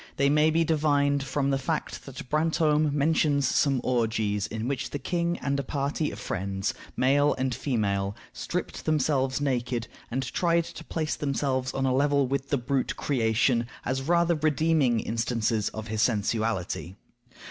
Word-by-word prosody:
They 140 0 +3
may 150 +2 +4
be 165 +1 +3
divined 145 -3 +2
from 140 +1 -1
the 135 - +1
fact 150 +2 -3
that 130 -1 -8
Brantome 155 0 +2
mentions 145 -1 +2
some 135 -1 +2
orgies 110 -4 0
in 110 +1 -4
which 140 -1 -2
the - - -3
king 170 +4 -1
and 140 +1 -1
a - - -1
party 140 +3 -1
of - - -8
friends, 95 +1 -2 0.2
male 140 +3 +3
and 130 -1 0
female, 100 -7 -1 0.2
stripped - - -4
themselves 140 -3 +1
naked, 125 -4 -1 0.2
and 130 +3 -1
tried 170 +5 +1
to - - -9
place 155 -2 -2
themselves 135 -2 -1
on 135 0 0
a 130 - +2
level 140 +1 +3
with 135 +1 -2
the 140 - +2
brute 130 +1 -1
creation, 115 -2 +1 0.2
as 130 +1 -1
rather 170 +4 +3
redeeming 155 -5 +2
instances 115 -1 0
of 110 0 -7
his 110 0 -2
sensuality. 110 -5 -1
135 Hz, 160 wpm, -27 LUFS, 120-150 Hz, 0.2 s, may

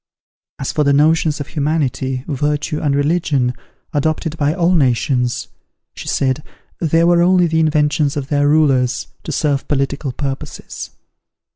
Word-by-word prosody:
As 135 - -3
for 150 - +1
the 140 -1 +3
notions 155 +1 +3
of 145 - -6
humanity, 140 -4 -1
virtue 150 +2 -1
and 145 -3 +1
religion, 145 -4 +1 0.4
adopted 155 +2 -1
by 145 -2 +1
all 175 +1 +2
nations, 125 -4 +1 0.5
she - - -9
said, 130 +1 0 0.4
they 165 0 +2
were 170 0 +4
only 180 0 +4
the 160 -1 +1
inventions 150 -2 +1
of 135 -2 -4
their 145 -1 +2
rulers, 135 -5 +2 0.2
to - - -6
serve 145 -3 0
political 140 0 -1
purposes. 135 +1 -6
145 Hz, 140 wpm, -18 LUFS, 135-160 Hz, 0.5 s, were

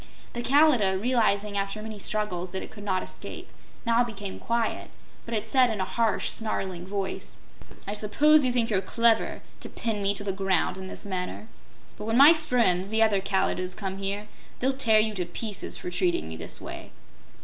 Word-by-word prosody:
The 240 - -3
Kalidah, 250 -8 +4
realizing 210 -3 +1
after 200 +1 -2
many 215 -1 -7
struggles 195 -4 -2
that 190 - -3
it - - -10
could 205 - -10
not 190 -2 0
escape, - - -9 0.3
now 235 +1 +4
became 205 -5 -6
quiet, 235 -1 -1 0.4
but 230 - -3
it 210 - -1
said 255 -3 +4
in 220 -2 -3
a 185 - 0
harsh, 230 +1 0
snarling 190 -5 -3
voice: 195 -1 -4 0.4
"I 200 - -3
suppose 285 +9 +4
you 255 - +2
think 235 -2 +1
you're 190 -2 +2
clever, 230 +3 +2 0.2
to - - -8
pin 220 -3 -3
me 200 0 +2
to 205 - -3
the 195 -1 -1
ground 190 -2 +1
in 190 - -6
this - - -7
manner. 185 +1 -4 0.5
But 210 - -5
when 225 +1 +1
my 285 +5 +10
friends, 235 - +1
the 220 +1 +3
other 205 -3 +3
Kalidahs, 185 -1 -1
come 195 -1 -4
here, 200 +2 -3 0.3
they'll 265 +2 +1
tear 230 -5 +4
you 215 0 +1
to 185 -3 -2
pieces 205 +3 -4
for 180 - -6
treating 175 - 0
me 80 - -6
this 80 0 -6
way." - - -8
210 Hz, 195 wpm, -27 LUFS, 190-230 Hz, 0.5 s, my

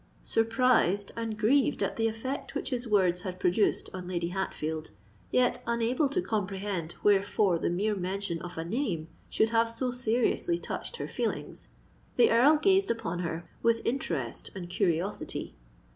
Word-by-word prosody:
Surprised 225 -4 +2
and 225 -2 -3
grieved 245 +6 +3
at - - -1
the 225 0 +1
effect 255 +6 -4
which 280 - -3
his 245 -1 -2
words 185 -4 +3
had 185 -1 -6
produced 180 +4 +2
on 185 -1 -6
Lady 175 -2 -1
Hatfield—yet 155 - -2
unable 235 +5 +1
to 355 +6 0
comprehend 195 -5 -2
wherefore 200 -3 +3
the - - 0
mere 200 +5 0
mention 185 -2 -3
of 175 -1 -8
a 165 - -3
name 175 - -2 0.2
should 220 +1 +2
have 230 0 +3
so 245 +2 -2
seriously 245 +8 +1
touched 480 - -5
her - - -4
feelings,—the 465 - -2
Earl 280 +7 +6
gazed 390 +4 +3
upon 200 -7 -2
her 165 -1 -4
with 230 0 +3
interest 165 - -2
and 180 -2 -6
curiosity. 180 +1 -1
210 Hz, 145 wpm, -29 LUFS, 175-235 Hz, 0.2 s, Earl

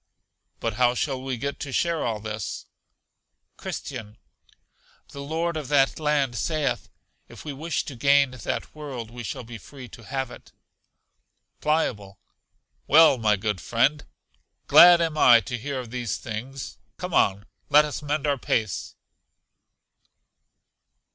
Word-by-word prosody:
But 115 -1 -3
how 125 0 +4
shall 135 -1 -2
we 130 -1 -3
get 140 +4 -4
to 140 - -6
share 170 +3 0
all 110 -2 -2
this? 105 -1 -5 0.9
Christian. 110 -5 -7 0.9
The 140 - -8
Lord 165 +4 -2
of 150 -4 -4
that 140 0 +2
land 145 -5 +1
saith, 145 +1 -1 0.4
if - - -13
we 150 - -4
wish 155 +5 -3
to 140 - -7
gain 140 +2 +4
that 130 -3 -5
world 135 -7 -7
we 120 0 -8
shall 120 - -5
be 115 0 -9
free 130 +3 -12
to 115 - -13
have 130 +3 -4
it. - - -14 1.1
Pliable. 105 -11 -1 0.7
Well, 155 -3 +6
my 105 -2 +3
good 100 -2 -3
friend, 140 - +1 0.6
glad 175 0 +8
am 160 -2 -1
I 120 -4 +8
to 125 - -5
hear 140 +2 -4
of 120 -3 -8
these 120 -5 -3
thing: 120 +5 -7 0.4
come - - -6
on, 100 +1 +2 0.2
let 150 +1 +6
us 150 - -5
mend 150 0 -2
our 140 -2 0
pace. 110 -6 -2
135 Hz, 140 wpm, -25 LUFS, 115-150 Hz, 1.1 s, glad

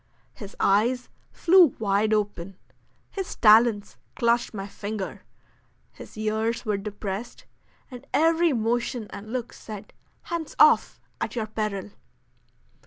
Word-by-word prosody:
His 205 -2 -10
eyes 235 +6 +2 0.2
flew 350 -4 +5
wide 210 0 +1
open, 200 -3 -2 0.5
his 385 -2 -5
talons 220 -1 +4 0.2
clutched 235 -1 +1
my 195 -3 -6
finger, 205 -1 -6 0.7
his - - -13
ears 220 +2 -1
were 210 -2 0
depressed, 205 +2 -6 0.5
and 255 +2 -11
every 330 +1 +3
motion 235 0 -1
and 205 +2 -9
look 245 -2 -4
said, 210 -3 -10 0.3
"Hands 335 -2 -5
off, - - +5 0.2
at - - -3
your 225 -2 -1
peril." 215 -2 -4
220 Hz, 115 wpm, -25 LUFS, 205-245 Hz, 0.7 s, flew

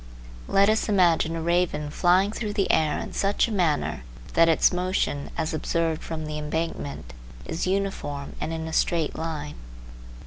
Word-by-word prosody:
Let 195 +1 +4
us 215 +1 +1
imagine 170 -4 +3
a 165 - -3
raven 170 -3 0
flying 185 +5 +3
through 215 -1 -4
the 200 -2 +1
air 155 -2 +2
in - - -6
such 200 +3 +1
a - - -5
manner 165 - 0 0.3
that 165 0 +5
its 165 - +4
motion, 180 -5 -1
as 160 -1 -1
observed 160 0 -1
from 160 -1 -5
the 150 0 -4
embankment, 150 - -4 0.3
is 165 - -3
uniform 185 -8 -2
and - - -2
in 160 0 -4
a 160 - -6
straight 165 -1 +1
line. 155 -2 -4
165 Hz, 165 wpm, -25 LUFS, 155-185 Hz, 0.3 s, that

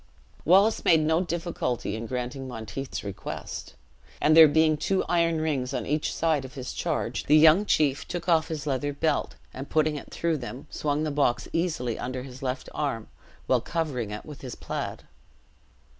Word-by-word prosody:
Wallace 195 +6 +5
made 160 -2 +5
no 160 +2 +2
difficulty 165 - -2
in 115 +1 -5
granting 125 +2 -4
Monteith's 125 +3 -6
request; 100 -2 -6 0.4
and, 155 +1 +4
there 160 -1 +10
being 155 +1 +4
two 190 +5 0
iron 170 -2 +2
rings 140 -4 -1
on 125 - -2
each 150 +1 0
side 155 -4 +1
of 130 -1 -10
his 130 -2 -5
charge, - - -2
the 150 - +6
young 160 +6 +6
chief 145 -2 +2
took 175 0 -5
off 165 -2 +3
his 155 -3 -4
leathern 145 0 -1
belt, 160 - 0 0.2
and 135 +2 -7
putting 155 -1 +2
it - - -9
through 170 -2 -1
them, 125 0 -7
swung 150 0 -1
the 155 - -1
box 140 -4 +1
easily 155 -9 -1
under 130 0 -4
his 130 0 -10
left 130 -1 -3
arm, 135 -7 -2 0.4
while - - +2
covering 140 -10 -2
it 105 0 -6
with 150 -2 -10
his 125 -3 -6
plaid. - - -5
145 Hz, 175 wpm, -27 LUFS, 130-160 Hz, 0.4 s, there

